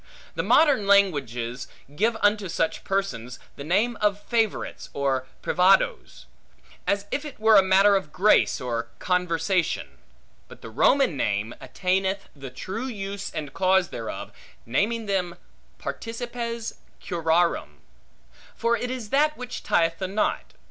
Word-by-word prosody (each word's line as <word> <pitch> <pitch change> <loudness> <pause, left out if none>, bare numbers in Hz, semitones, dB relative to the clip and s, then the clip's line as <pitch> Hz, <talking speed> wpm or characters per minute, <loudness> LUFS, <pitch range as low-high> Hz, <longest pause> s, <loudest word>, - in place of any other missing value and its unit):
The - - -1
modern 280 -10 +4
languages 135 - +1 0.3
give 225 +6 +1
unto 205 -2 +2
such 165 0 -1
persons 125 - -2 0.2
the 140 - -8
name 210 +9 +1
of 205 -1 +2
favorites, 225 -1 -2
or 135 -2 -1 0.2
privadoes; 180 - +2 0.6
as 200 0 +1
if 285 - -1
it 295 -6 -9
were 220 -2 +7
matter 195 +2 +5
of 190 -6 -2
grace, 205 +6 +3
or 115 -2 -3
conversation. 180 0 -1 0.5
But - - -15
the - - -8
Roman 275 - +3
name 105 -2 -1
attaineth 190 +1 -1
the 135 -2 -8
true 220 - -5
use 200 -4 -5
and 150 -3 -6
cause 190 -1 +2
thereof, 115 -1 -6 0.3
naming 215 - 0
them 185 -4 -1 0.4
participes 235 0 -5 0.2
curarum; 165 - 0 0.7
for 235 +1 +1
it 245 - -3
is 250 -5 -5
that 300 +2 +3
which 250 0 -6
tieth 165 -1 +1
the 190 - -2
knot. 200 +3 -2
195 Hz, 130 wpm, -25 LUFS, 160-220 Hz, 0.7 s, were